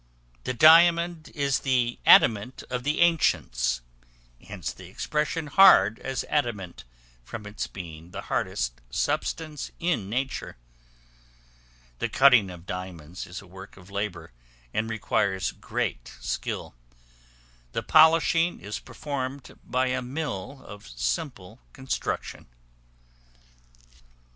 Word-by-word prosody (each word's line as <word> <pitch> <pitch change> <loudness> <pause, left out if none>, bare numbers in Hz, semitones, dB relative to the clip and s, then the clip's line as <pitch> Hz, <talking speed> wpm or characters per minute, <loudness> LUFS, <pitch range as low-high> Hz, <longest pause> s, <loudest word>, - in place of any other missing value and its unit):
The - - -1
diamond 170 +3 +6
is 140 -2 +1
the 125 -3 0
Adamant 115 +3 +5
of 125 -1 -1
the 150 +5 0
ancients; 60 - +2 0.6
hence - - -6
the - - -12
expression 150 +1 -2
"hard 140 - +6
as 135 -2 -3
adamant," 105 - -2 0.4
from 105 - -8
its 105 0 -4
being 85 -3 -9
the - - -7
hardest - - -2
substance 155 - -2
in 165 - -1
nature. 130 - -3 1.4
The - - -1
cutting 125 -8 +5
of 90 -1 -11
diamonds 90 -2 -7
is 90 +3 -8
a - - -15
work 95 +2 -12
of 95 +1 -15
labor, 95 -5 -4 0.4
and 110 +1 -1
requires 100 -3 0
great - - -4
skill; - - -4 1.0
the - - -2
polishing 165 +2 +4
is 105 +1 -6
performed 135 -2 -6
by 130 0 0
a 130 0 -1
mill 135 -2 -5
of 100 -6 -11
simple 110 - -4
construction. 130 - -4
120 Hz, 110 wpm, -26 LUFS, 95-145 Hz, 1.4 s, diamond